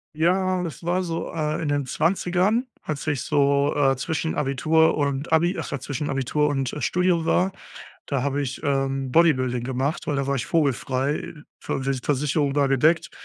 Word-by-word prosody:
Ja, 185 Hz, +3 st, +2 dB
und 180 Hz, -, -2 dB
das 165 Hz, -5 st, -7 dB
war 180 Hz, +2 st, 0 dB
so, 165 Hz, -2 st, -4 dB
äh, 155 Hz, -2 st, -1 dB
in 160 Hz, -, -2 dB
den 145 Hz, -1 st, 0 dB
20ern, 180 Hz, -, +1 dB, 0.2 s
als 150 Hz, -3 st, -5 dB
ich 145 Hz, -4 st, -1 dB
so, 140 Hz, -1 st, +2 dB
äh, 135 Hz, -2 st, +3 dB
zwischen 160 Hz, +4 st, -2 dB
Abitur 155 Hz, +4 st, +2 dB
und 140 Hz, +1 st, -1 dB
Abi 170 Hz, +3 st, +3 dB
ach -, -, -5 dB
ja, 140 Hz, -, -3 dB
zwischen 145 Hz, +2 st, -4 dB
Abitur 135 Hz, +3 st, 0 dB
und, 135 Hz, -3 st, -2 dB
äh, 150 Hz, -, -5 dB
Studium 180 Hz, -2 st, +1 dB
war, 185 Hz, +3 st, +2 dB, 0.6 s
da 140 Hz, -3 st, -1 dB
habe 140 Hz, +1 st, -1 dB
ich, 135 Hz, -1 st, -4 dB
ähm, 135 Hz, -2 st, -1 dB
Bodybuilding 130 Hz, -6 st, +3 dB
gemacht, 130 Hz, +5 st, -2 dB
weil 150 Hz, -, -1 dB
da 140 Hz, -1 st, -1 dB
war 140 Hz, -, +1 dB
ich 125 Hz, -, -3 dB
vogelfrei. 140 Hz, -3 st, 0 dB, 0.2 s
V 135 Hz, -, -3 dB
Ver 135 Hz, 0 st, 0 dB
Versicherung 145 Hz, 0 st, 0 dB
war 145 Hz, -1 st, +2 dB
gedeckt. 155 Hz, +5 st, +2 dB
145 Hz, 185 wpm, -24 LUFS, 135-165 Hz, 0.6 s, äh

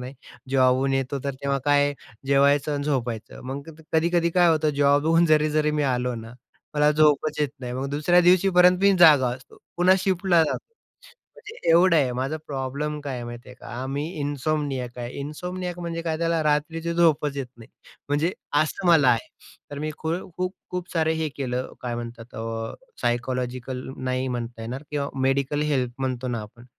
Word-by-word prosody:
नाही. 125 Hz, +2 st, -7 dB, 0.4 s
जॉबहून 130 Hz, 0 st, +3 dB
येतो, 135 Hz, +1 st, -1 dB
तर 140 Hz, -, -2 dB
तेव्हा 140 Hz, 0 st, 0 dB
काय 145 Hz, 0 st, +3 dB, 0.3 s
जेवायचं 140 Hz, +1 st, +3 dB
अन् 145 Hz, -, -2 dB
झोपायचं 120 Hz, -6 st, -3 dB
मग, 140 Hz, +3 st, -6 dB
तर -, -, -15 dB
कधी-कधी 170 Hz, +1 st, +2 dB
काय 175 Hz, 0 st, +4 dB
होतं, 155 Hz, -1 st, +2 dB
जॉबहून 145 Hz, +4 st, +4 dB
जरी 155 Hz, -1 st, +3 dB
जरी 150 Hz, 0 st, +2 dB
मी 150 Hz, 0 st, 0 dB
आलो 125 Hz, 0 st, -1 dB
ना, 115 Hz, +1 st, -9 dB, 0.4 s
मला 150 Hz, 0 st, +4 dB
झोपच 150 Hz, 0 st, +2 dB
येत 150 Hz, -, +2 dB
नाही, 125 Hz, -1 st, -5 dB
मग 130 Hz, +2 st, -3 dB
दुसऱ्या 155 Hz, +5 st, +3 dB
दिवशीपर्यंत 180 Hz, 0 st, +5 dB
मी 200 Hz, 0 st, +6 dB
जागा 150 Hz, -7 st, +7 dB
असतो. 130 Hz, 0 st, -16 dB, 0.2 s
पुन्हा 180 Hz, +2 st, +5 dB
शिफ्टला 185 Hz, -2 st, +2 dB
जातो, -, -, -3 dB, 0.7 s
म्हणजे 430 Hz, +2 st, -12 dB
एवढं 170 Hz, +1 st, +5 dB
आहे 135 Hz, -5 st, +2 dB
माझा 135 Hz, +5 st, -2 dB
प्रॉब्लेम 140 Hz, +2 st, -3 dB
काय 140 Hz, -2 st, -5 dB
आहे 120 Hz, -1 st, -5 dB
माहिती 120 Hz, +1 st, -9 dB
आहे 125 Hz, -, -11 dB
का, -, -, -11 dB, 0.2 s
आम्ही 140 Hz, +3 st, -3 dB, 0.2 s
इनसोमनियाक 140 Hz, -3 st, -2 dB
आहे. 120 Hz, 0 st, -5 dB
इनसोमनियाक 180 Hz, +5 st, -5 dB
म्हणजे 165 Hz, -1 st, -4 dB
काय 160 Hz, -1 st, -2 dB
त्याला 165 Hz, -1 st, +1 dB
रात्रीची 160 Hz, +3 st, 0 dB
झोपच 150 Hz, -4 st, +2 dB
येत 135 Hz, -, -3 dB
नाही, 115 Hz, -, -13 dB, 0.4 s
म्हणजे 150 Hz, +5 st, +1 dB, 0.3 s
असं 175 Hz, +4 st, -4 dB
मला 155 Hz, -6 st, +6 dB
आहे. 115 Hz, -2 st, 0 dB, 0.4 s
तर 145 Hz, -, -6 dB
मी 155 Hz, +1 st, -3 dB
खू 160 Hz, 0 st, -2 dB, 0.2 s
खूप-खूप 180 Hz, 0 st, -5 dB
सारे 160 Hz, -2 st, +2 dB
हे 160 Hz, -1 st, -1 dB
केलं 130 Hz, -2 st, -3 dB
काय 120 Hz, -1 st, -3 dB
म्हणतात 120 Hz, 0 st, -8 dB
अ, 115 Hz, 0 st, -4 dB, 0.3 s
सायकॉलॉजिकल 125 Hz, +1 st, -2 dB
नाही 130 Hz, 0 st, -2 dB
म्हणता 120 Hz, -2 st, -5 dB
येणार 125 Hz, +5 st, -5 dB
किंवा 145 Hz, -1 st, -2 dB
मेडिकल 135 Hz, +2 st, +1 dB
हेल्प 135 Hz, -5 st, 0 dB
म्हणतो 130 Hz, -1 st, -2 dB
ना 120 Hz, -2 st, -2 dB
आपण, 110 Hz, +3 st, -14 dB
145 Hz, 175 wpm, -24 LUFS, 130-160 Hz, 0.7 s, जागा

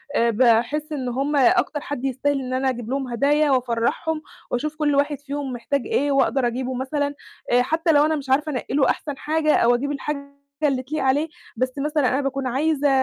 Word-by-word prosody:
آآ، 235 Hz, 0 st, +3 dB
باحس 245 Hz, +6 st, +2 dB
إن 265 Hz, -4 st, -3 dB
هُم 275 Hz, +4 st, -1 dB
أكتر 310 Hz, 0 st, +3 dB
حد 275 Hz, -2 st, -5 dB
يستاهل 270 Hz, +2 st, 0 dB
إن 255 Hz, 0 st, -4 dB
أنا 265 Hz, +1 st, +1 dB
أجيب 240 Hz, -2 st, -4 dB
لهُم 270 Hz, -1 st, -2 dB
هدايا 285 Hz, +4 st, +2 dB
وأفرّحهم، 255 Hz, +5 st, 0 dB, 0.3 s
وأشوف 300 Hz, +5 st, -2 dB
كل 300 Hz, -2 st, +1 dB
واحد 285 Hz, 0 st, +1 dB
فيهم 280 Hz, -2 st, -5 dB
محتاج 270 Hz, +3 st, -1 dB
إيه، 285 Hz, +1 st, +1 dB
وأقدر 270 Hz, -1 st, +2 dB
أجيبه 255 Hz, +2 st, -3 dB
مثلًا، 285 Hz, +3 st, -2 dB, 0.4 s
آآ، 245 Hz, -, +5 dB
حتى 325 Hz, +6 st, +1 dB
لو 295 Hz, -1 st, +5 dB
أنا 315 Hz, 0 st, +1 dB
مش 275 Hz, -3 st, -6 dB
عارفة 300 Hz, +3 st, +2 dB
أنقّي 255 Hz, 0 st, -4 dB
له 285 Hz, -, +3 dB
أحسن 290 Hz, -3 st, -2 dB
حاجة 310 Hz, +1 st, +1 dB
أو 240 Hz, +1 st, +4 dB
أجيب 285 Hz, +4 st, -2 dB
الحاجة 280 Hz, 0 st, -5 dB, 0.2 s
اللي 270 Hz, -3 st, +1 dB
تليق 290 Hz, +2 st, -3 dB
عليه، 280 Hz, +4 st, +2 dB, 0.3 s
بس 255 Hz, +1 st, 0 dB
مثلًا 295 Hz, -2 st, +1 dB
أنا 270 Hz, +3 st, +1 dB
باكون 275 Hz, -1 st, -2 dB
عايزة 290 Hz, +3 st, +1 dB
275 Hz, 200 wpm, -23 LUFS, 255-295 Hz, 0.4 s, آآ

